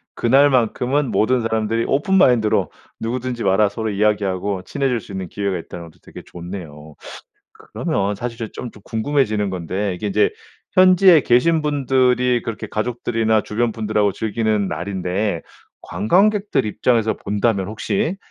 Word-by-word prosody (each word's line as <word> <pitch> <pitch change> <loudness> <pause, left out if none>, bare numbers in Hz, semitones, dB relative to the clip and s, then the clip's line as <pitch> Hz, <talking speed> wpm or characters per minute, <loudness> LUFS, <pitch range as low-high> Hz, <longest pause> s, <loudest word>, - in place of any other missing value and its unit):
그날만큼은 130 +1 +2
모든 125 +3 +2
사람들이 110 0 -1
오픈 150 +8 +1
마인드로 120 - +3 0.3
'누구든지 120 +1 -3
와라.' 100 +2 +3
서로 110 +2 -4
이야기하고 100 -2 0
친해질 135 +1 -1
수 - - -13
있는 95 -1 -5
기회가 100 +1 -3
있다는 85 0 -8
것도 80 - -23
되게 - - -11
좋네요. 85 -4 -9 0.8
그러면 100 +1 -1
사실 115 +2 -5
저 115 - -4
좀 120 - -8
좀 105 - -17
궁금해지는 110 -4 0
건데 95 +2 -3
이게 95 +4 -4
이제 105 +1 +2 0.4
현지에 185 -3 +6
계신 155 +7 +3
분들이 130 -4 +1
그렇게 115 -2 -6
가족들이나 115 -1 0
주변 115 +2 -1
분들하고 105 -2 0
즐기는 110 0 -1
날인데 90 +2 -2 0.4
관광객들 200 - +1
입장에서 110 +1 +1
본다면 100 -1 -1
혹시 195 - -2
110 Hz, 355 characters per minute, -20 LUFS, 100-125 Hz, 0.8 s, 현지에